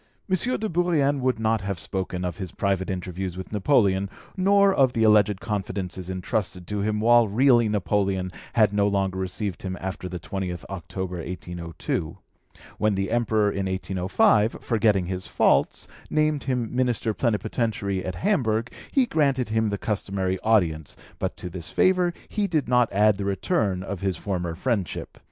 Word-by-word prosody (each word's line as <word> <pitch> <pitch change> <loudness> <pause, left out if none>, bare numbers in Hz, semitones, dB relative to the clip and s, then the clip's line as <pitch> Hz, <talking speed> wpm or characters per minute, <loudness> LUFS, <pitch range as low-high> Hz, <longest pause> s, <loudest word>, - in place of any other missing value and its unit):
M. 190 - +2 0.2
de 220 - -1
Bourrienne 165 -6 +1
would 130 -2 +1
not 110 -1 +1
have 100 -1 -3
spoken 90 0 -3
of 90 0 -4
his 95 -4 -5
private 95 -2 -1
interviews 90 0 -4
with 95 - -7
Napoleon, 100 -3 +2 0.3
nor 200 +1 +4
of 130 -6 +3
the 115 - +1
alleged 105 -2 +4
confidences 95 -3 -4
entrusted 95 0 -2
to 105 +3 -3
him, 105 +1 0
while 120 +1 +5
really 120 +1 +4
Napoleon 100 -2 0 0.2
had 110 -3 +4
no 100 0 +3
longer 95 -2 0
received 95 +1 -3
him 95 -1 -4
after 95 0 -5
the 90 0 -5
20th 90 +2 -5
October 90 0 -5
1802. 85 -1 -4 0.6
When 105 -1 +2
the 95 +2 -2
Emperor, 110 -3 +2
in 95 -1 -2
1805, 95 +4 +2
forgetting 105 -5 +2
his 90 +1 -4
faults, - - +2 0.2
named 155 -1 +1
him 125 -3 -2
Minister 120 -3 +1
Plenipotentiary 105 -4 -1
at 95 - -4
Hamburg, 120 - 0 0.2
he 270 -2 +3
granted 140 - +1
him 110 0 +1
the 100 - -2
customary 95 -3 -2
audience, 85 -10 +1 0.2
but - - -2
to - - -6
this 90 -1 -6
favour 180 -1 +3 0.2
he 210 -2 -1
did 155 -7 0
not 125 -1 +3
add 105 0 +4
the 100 - -3
return 100 - 0
of 95 -2 -5
his 95 -2 -1
former 90 -4 -3
friendship. 100 -2 -3
100 Hz, 160 wpm, -25 LUFS, 95-120 Hz, 0.6 s, while